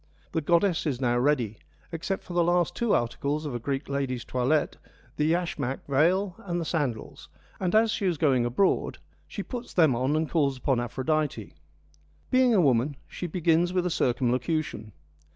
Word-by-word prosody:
The 160 Hz, -, -1 dB
goddess 170 Hz, +2 st, +2 dB
is 130 Hz, -5 st, -1 dB
now 120 Hz, -2 st, +1 dB
ready, 125 Hz, -6 st, 0 dB, 0.3 s
except 180 Hz, +4 st, -3 dB
for 180 Hz, -, -9 dB
the 175 Hz, 0 st, +3 dB
last 175 Hz, 0 st, +2 dB
two 235 Hz, -3 st, 0 dB
articles 140 Hz, +6 st, -1 dB
of 145 Hz, -, -4 dB
a 120 Hz, -, -3 dB
Greek 135 Hz, +4 st, -3 dB
lady's 135 Hz, -3 st, -2 dB
toilette, 130 Hz, +5 st, 0 dB, 0.4 s
the 150 Hz, +1 st, +1 dB
yashmak 160 Hz, -7 st, -2 dB
veil 175 Hz, +8 st, +2 dB
and 175 Hz, -2 st, -3 dB
the 165 Hz, -, -3 dB
sandals, 140 Hz, -9 st, -3 dB, 0.3 s
and 185 Hz, +1 st, 0 dB
as 220 Hz, 0 st, +4 dB
she 200 Hz, -3 st, -1 dB
is 175 Hz, -3 st, 0 dB
going 135 Hz, -5 st, +3 dB
abroad 120 Hz, +11 st, +1 dB, 0.3 s
she -, -, -5 dB
puts 245 Hz, -2 st, -7 dB
them 160 Hz, -8 st, +4 dB
on 130 Hz, +5 st, 0 dB
and 155 Hz, 0 st, 0 dB
calls 140 Hz, -5 st, +1 dB
upon 130 Hz, -1 st, 0 dB
Aphrodite. 130 Hz, -1 st, -2 dB, 0.8 s
Being 255 Hz, -2 st, +4 dB
a -, -, +5 dB
woman, 135 Hz, -1 st, +2 dB
she 175 Hz, -, -5 dB
begins 170 Hz, +1 st, +1 dB
with 180 Hz, -1 st, +1 dB
a 180 Hz, -, 0 dB
circumlocution. 125 Hz, -2 st, -1 dB
155 Hz, 170 wpm, -27 LUFS, 130-175 Hz, 0.8 s, a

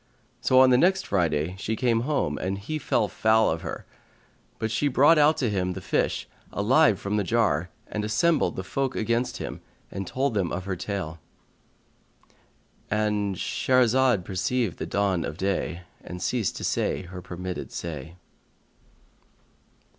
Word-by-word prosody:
Now 130 Hz, -, +5 dB
on 130 Hz, 0 st, +7 dB
the 125 Hz, -, +5 dB
next 190 Hz, +4 st, +3 dB
Friday 85 Hz, -2 st, 0 dB
she 110 Hz, +3 st, -2 dB
came 115 Hz, 0 st, +2 dB
home 140 Hz, +4 st, -1 dB
and 95 Hz, +1 st, -2 dB
he 155 Hz, +11 st, -4 dB
fell 115 Hz, -5 st, +1 dB
foul 110 Hz, +1 st, +3 dB
of 80 Hz, -, -3 dB
her; -, -, -6 dB, 0.7 s
but 110 Hz, -, -2 dB
she 130 Hz, +6 st, +1 dB
brought 145 Hz, +4 st, +5 dB
out 150 Hz, +1 st, +5 dB
to 125 Hz, -, 0 dB
him 90 Hz, -3 st, -1 dB
the 95 Hz, -, -6 dB
fish 90 Hz, -, -1 dB, 0.2 s
alive -, -, +3 dB
from 100 Hz, +1 st, -2 dB
the 105 Hz, -, +1 dB
jar 90 Hz, -6 st, +1 dB, 0.2 s
and 105 Hz, -, -4 dB
assembled 110 Hz, +11 st, +2 dB
the -, -, -4 dB
folk 135 Hz, -2 st, -2 dB
against 115 Hz, +3 st, 0 dB
him -, -, -6 dB, 0.3 s
and 95 Hz, 0 st, -5 dB
told 135 Hz, +4 st, 0 dB
them 95 Hz, -5 st, 0 dB
her 95 Hz, +1 st, -3 dB
tale.—And 100 Hz, +3 st, -6 dB
Shahrazad 125 Hz, -1 st, +2 dB
perceived 95 Hz, -, -1 dB
the -, -, -3 dB
dawn 100 Hz, -4 st, 0 dB
of 75 Hz, -, -5 dB
day 95 Hz, -2 st, -2 dB, 0.2 s
and 90 Hz, -, -7 dB
ceased 110 Hz, +2 st, -1 dB
to -, -, -6 dB
say -, -, 0 dB
her 90 Hz, 0 st, -9 dB
permitted 90 Hz, +1 st, -6 dB
say. 80 Hz, 0 st, -6 dB
105 Hz, 150 wpm, -26 LUFS, 90-125 Hz, 0.7 s, on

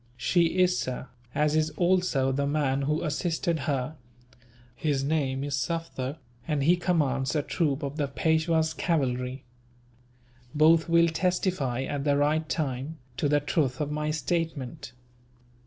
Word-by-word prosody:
"She 170 Hz, +6 st, +2 dB
is, 180 Hz, 0 st, +3 dB
sir, 130 Hz, 0 st, -4 dB, 0.3 s
as 150 Hz, 0 st, +2 dB
is 155 Hz, 0 st, +2 dB
also 175 Hz, -7 st, +2 dB
the 140 Hz, +1 st, 0 dB
man 140 Hz, -2 st, +1 dB
who 150 Hz, +4 st, 0 dB
assisted 165 Hz, +1 st, -1 dB
her. 140 Hz, +2 st, -2 dB, 0.8 s
His 140 Hz, 0 st, 0 dB
name 140 Hz, -3 st, 0 dB
is 145 Hz, -1 st, -2 dB
Sufder, 140 Hz, 0 st, -3 dB, 0.3 s
and 150 Hz, -3 st, 0 dB
he 170 Hz, +5 st, +5 dB
commands 150 Hz, -7 st, 0 dB
a 150 Hz, -, +1 dB
troop 145 Hz, -3 st, -1 dB
of 140 Hz, +1 st, -4 dB
the 145 Hz, -3 st, 0 dB
Peishwa's 160 Hz, +2 st, +1 dB
cavalry. 130 Hz, -5 st, -1 dB, 1.1 s
Both 160 Hz, +2 st, +5 dB
will 170 Hz, 0 st, +5 dB
testify, 165 Hz, -7 st, 0 dB
at 140 Hz, 0 st, -3 dB
the 145 Hz, -1 st, +2 dB
right 155 Hz, +2 st, +1 dB
time, 145 Hz, 0 st, -2 dB, 0.2 s
to 145 Hz, -, +1 dB
the 145 Hz, 0 st, +3 dB
truth 140 Hz, -3 st, 0 dB
of 150 Hz, -1 st, -2 dB
my 150 Hz, 0 st, -1 dB
statement." 155 Hz, -4 st, -3 dB
150 Hz, 140 wpm, -27 LUFS, 135-165 Hz, 1.1 s, he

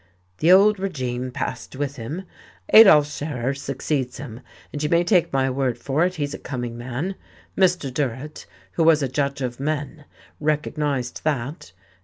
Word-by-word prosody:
"The 165 Hz, +3 st, +4 dB
old 200 Hz, +2 st, +6 dB
regime 130 Hz, -9 st, -3 dB
passed 125 Hz, 0 st, -5 dB
with 140 Hz, 0 st, -3 dB
him. 145 Hz, +11 st, -5 dB, 0.5 s
Adolf 190 Hz, -10 st, +9 dB
Scherer 145 Hz, -3 st, -3 dB
succeeds 135 Hz, -1 st, -3 dB
him, 125 Hz, -3 st, -8 dB, 0.3 s
and 145 Hz, -, -4 dB
you 150 Hz, -, 0 dB
may 170 Hz, +1 st, +3 dB
take 175 Hz, -1 st, +2 dB
my 135 Hz, -1 st, +1 dB
word 130 Hz, -2 st, -1 dB
for 145 Hz, +4 st, 0 dB
it, 185 Hz, +1 st, 0 dB
he's 145 Hz, -3 st, -3 dB
a -, -, -6 dB
coming 125 Hz, -3 st, -5 dB
man. 125 Hz, +10 st, -4 dB, 0.4 s
Mr. 180 Hz, -8 st, +2 dB
Durrett, 140 Hz, +2 st, -4 dB, 0.2 s
who 165 Hz, -, 0 dB
was 160 Hz, -2 st, +5 dB
a -, -, +1 dB
judge 140 Hz, +1 st, -2 dB
of 120 Hz, -1 st, -4 dB
men, 150 Hz, +1 st, -3 dB, 0.3 s
recognized 150 Hz, -4 st, -1 dB
that. 145 Hz, -, -3 dB
145 Hz, 160 wpm, -23 LUFS, 130-155 Hz, 0.5 s, Adolf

